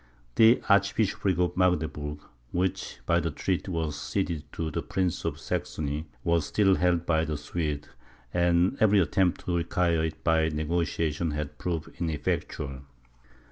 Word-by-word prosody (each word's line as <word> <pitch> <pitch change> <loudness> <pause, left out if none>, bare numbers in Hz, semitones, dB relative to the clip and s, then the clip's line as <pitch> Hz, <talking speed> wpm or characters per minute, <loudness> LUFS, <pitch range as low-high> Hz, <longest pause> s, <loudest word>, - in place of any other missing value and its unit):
The 115 - +6
archbishopric 100 -2 +2
of 90 0 +1
Magdeburg 80 -5 0 0.3
which, 95 +1 -1
by - - +3
the - - -1
treaty, 95 0 -2
was 80 -4 -2
ceded 80 -2 -2
to 80 -1 -3
the - - -2
prince 90 -3 -1
of - - -2
Saxony, 75 +1 -3 0.2
was 85 -3 +1
still 100 -2 +3
held 90 -1 +2
by 80 -1 +2
the 75 -2 -2
Swedes, 75 -1 -3 0.5
and 85 +4 +3
every 105 -1 +5
attempt 90 +1 +1
to 85 -1 +1
acquire 85 -1 +1
it 80 -1 -6
by 80 -1 +3
negociation 80 0 -1
had 75 0 -4
proved 85 -3 -3
ineffectual. 75 -3 -2
85 Hz, 140 wpm, -28 LUFS, 75-90 Hz, 0.5 s, The